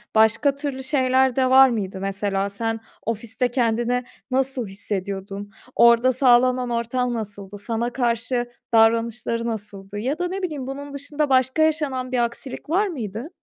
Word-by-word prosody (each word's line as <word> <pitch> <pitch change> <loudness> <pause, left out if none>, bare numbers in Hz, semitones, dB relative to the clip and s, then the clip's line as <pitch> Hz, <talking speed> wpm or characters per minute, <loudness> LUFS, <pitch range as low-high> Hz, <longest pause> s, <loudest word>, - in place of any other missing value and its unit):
başka 230 +6 +4
türlü 280 -2 -4
şeyler 260 -2 +2
de 260 -1 +2
var 265 0 +8
mıydı? 195 -5 -3
Mesela 195 0 -1
sen 225 +2 -3 0.3
ofiste 230 +2 -1
kendini 240 0 +1 0.3
nasıl 260 -3 0
hissediyordun? 195 0 -5 0.2
Orada 235 +2 +6
sağlanan 250 0 +4
ortam 240 +1 -1
nasıldı? 205 -3 -6
Sana 230 +3 -2
karşı 240 0 -1 0.2
davranışları 230 +1 +2
nasıldı? 205 -2 -6
Ya 270 +7 -2
da 355 - 0
ne 385 +2 -4
bileyim, 295 -7 -4
bunun 280 +1 -6
dışında 285 +1 -2
başka 260 +3 +3
yaşanan 285 -5 0
bir 255 - 0
aksilik 235 +4 -6
var 395 +6 +2
mıydı? 235 - -5
240 Hz, 145 wpm, -23 LUFS, 220-265 Hz, 0.3 s, var